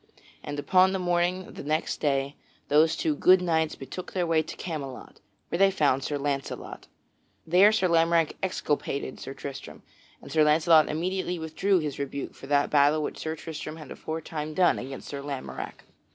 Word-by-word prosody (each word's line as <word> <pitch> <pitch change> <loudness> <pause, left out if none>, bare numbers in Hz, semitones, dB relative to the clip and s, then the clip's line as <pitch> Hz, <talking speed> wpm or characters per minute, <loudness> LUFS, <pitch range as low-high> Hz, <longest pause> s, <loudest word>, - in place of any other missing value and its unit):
And 145 0 -6
upon 185 +5 +4
the - - 0
morning 180 0 0
of - - -13
the - - -8
next 155 +2 -1
day 140 -1 0 0.3
those 155 +2 +4
two 315 - 0
good 185 -9 +5
knights 160 -3 0
betook 135 +7 -8
their 180 -2 0
way 165 -1 +3
to - - -8
Camelot, 140 -7 -7 0.3
where 170 - -2
they 195 0 +6
found 145 -8 +1
Sir 145 - -2
Launcelot. 140 -1 -4 0.6
There 180 +6 +6
Sir 215 -4 +2
Lamorack 165 -1 +3
exculpated 145 -7 -2
Sir 135 - -7
Tristram, 140 -1 -8 0.4
and - - -12
Sir 155 -1 +4
Launcelot 155 +1 +5
immediately 180 +2 -2
withdrew 165 +5 +1
his 150 -5 -3
rebuke 140 0 -4
for 135 - -12
that 145 0 +2
battle 150 +1 +4
which - - -5
Sir 160 0 -3
Tristram 155 0 -7
had 155 -2 -11
aforetime 155 -1 -5
done 180 -2 +3
against 135 +2 -7
Sir 140 -1 -5
Lamorack. 140 -2 -6
155 Hz, 175 wpm, -27 LUFS, 145-175 Hz, 0.6 s, they